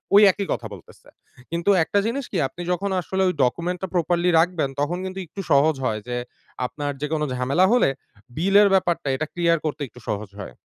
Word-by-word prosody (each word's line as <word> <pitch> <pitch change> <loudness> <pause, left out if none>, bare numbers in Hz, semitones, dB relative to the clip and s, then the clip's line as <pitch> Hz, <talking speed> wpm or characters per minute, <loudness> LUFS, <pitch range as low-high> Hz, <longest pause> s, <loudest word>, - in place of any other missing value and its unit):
ওই 205 - +9
একই 200 +1 -4
কথা 115 - -5
বলতেছে। 90 - -15 0.4
কিন্তু 170 +3 -1
একটা 200 - +1
জিনিস 260 +5 -1
কি - - -1
আপনি 175 - -10
যখন 190 +3 -1
আসলে 190 +2 -2
ওই 180 - +1
document 170 +8 0
টা 190 - -2
properly 175 0 +1
রাখবেন 165 -4 +1
তখন 150 +5 0
কিন্তু 190 0 -5
একটু 185 +4 -7
সহজ 145 +3 +4
হয় 110 -3 0
যে, 125 - -3 0.5
আপনার 145 +3 -3
যেকোনো 150 0 -1
ঝামেলা 135 +9 +2
হলে, 245 - +4 0.5
bill 195 +5 0
এর 205 - +6
ব্যাপারটা 175 -6 +1
এটা 155 - -2
clear 170 -1 +2
করতে 150 -1 -3
একটু 125 - -16
সহজ 105 -1 -3
হয়। 100 - -7
170 Hz, 195 wpm, -23 LUFS, 145-185 Hz, 0.5 s, ওই